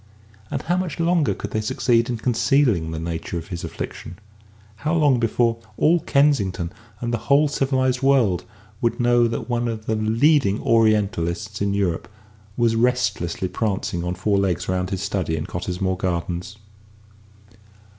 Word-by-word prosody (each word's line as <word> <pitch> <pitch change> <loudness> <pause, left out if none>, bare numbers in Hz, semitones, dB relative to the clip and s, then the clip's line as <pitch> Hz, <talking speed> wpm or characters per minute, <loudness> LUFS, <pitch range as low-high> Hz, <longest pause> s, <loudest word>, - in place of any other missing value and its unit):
And - - -3
how 175 +2 0
much 180 -3 -3
longer 170 -2 +2
could - - -6
they 110 - -1
succeed 115 +2 +1
in 120 - -1
concealing 115 - +2
the 80 - -4
nature 80 +1 -4
of 85 +1 -7
his 85 -3 -5
affliction? 90 - -7 0.6
How 155 +8 -1
long 145 -6 +3
before 115 0 +1 0.2
all 170 +3 +4
Kensington, 115 - +1 0.3
and 120 0 -3
the 120 - 0
whole 145 +2 +5
civilised 130 -2 0
world, 130 -10 +3 0.4
would 115 - 0
know 120 -1 +4
that 115 - -4
one 120 -1 -1
of 110 -2 -4
the 110 - 0
leading 110 +1 +3
Orientalists 105 -3 +1
in 100 0 +1
Europe 95 -5 -1 0.5
was 115 -1 +2
restlessly 115 -7 0
prancing 95 -2 -2
on 90 +1 -2
four 100 +2 +1
legs 95 -4 0
around 90 0 -1
his 95 -1 -3
study 90 -5 -1
in 75 - -3
Cottesmore 90 +1 -2
Gardens? 90 +3 -3
110 Hz, 155 wpm, -22 LUFS, 90-125 Hz, 0.6 s, whole